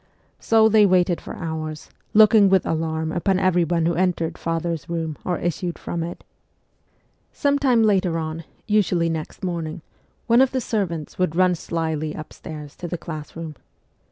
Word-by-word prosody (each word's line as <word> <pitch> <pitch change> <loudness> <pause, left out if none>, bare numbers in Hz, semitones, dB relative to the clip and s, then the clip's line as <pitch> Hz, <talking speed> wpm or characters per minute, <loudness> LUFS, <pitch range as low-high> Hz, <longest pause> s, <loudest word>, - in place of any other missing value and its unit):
So 220 -1 +4
they 215 -1 +5
waited 180 -2 +2
for - - -8
hours, 155 -2 -5 0.2
looking 215 -1 +7
with 190 0 +3
alarm 160 0 -1
upon 185 +3 +1
everyone 175 -3 +2
who 170 - +2
entered 175 -2 0
father's 165 -1 -3
room 165 -2 -2
or 180 -2 -1
issued 175 0 -2
from 170 - -4
it. 170 +1 -6 1.1
Some 285 0 +1
time 250 -5 +3
later 190 -5 +2
on, 160 0 -4 0.2
usually 185 -6 +2
next 160 +3 -5
morning, 170 -2 -3 0.4
one 235 +1 +5
of 265 -1 +3
the 260 - +1
servants 180 - -3
would 180 -3 +1
run 185 0 +4
slyly 160 -2 -3
upstairs 155 -1 -9
to 175 - -5
the 175 - -3
class 155 -2 -8
room. 165 -2 -6
170 Hz, 155 wpm, -23 LUFS, 160-190 Hz, 1.1 s, looking